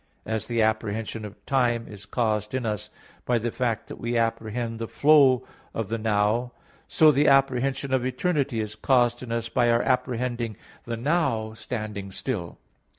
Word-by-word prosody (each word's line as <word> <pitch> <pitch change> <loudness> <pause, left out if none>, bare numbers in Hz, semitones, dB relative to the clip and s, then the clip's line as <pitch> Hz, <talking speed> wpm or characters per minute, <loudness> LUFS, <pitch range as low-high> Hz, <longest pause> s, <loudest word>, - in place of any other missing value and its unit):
As 110 -2 -2
the 115 -2 +1
apprehension 110 0 -1
of 105 0 -12
time 120 -4 +1
is 100 -1 -11
caused 105 0 -1
in 130 -2 -2
us 105 -3 -3 0.3
by 125 - +1
the 115 +1 -2
fact 120 -3 -1
that - - -9
we 120 +1 -2
apprehend 115 0 -1
the 115 - -3
flow 140 -3 +5 0.3
of 110 -3 -3
the 115 0 -2
"now," 110 +3 +1 0.3
so 155 -1 +6
the 145 +1 +3
apprehension 135 0 +2
of 130 -2 +2
eternity 130 -2 0
is 105 -1 -4
caused 120 -1 +2
in 125 -2 -7
us 115 -1 -1
by 120 +1 +2
our 115 +1 +3
apprehending 125 -3 -1 0.3
the 115 -1 -3
"now" 120 -5 0
standing 105 -4 -5
still. 95 -5 -4
115 Hz, 165 wpm, -26 LUFS, 110-130 Hz, 0.3 s, so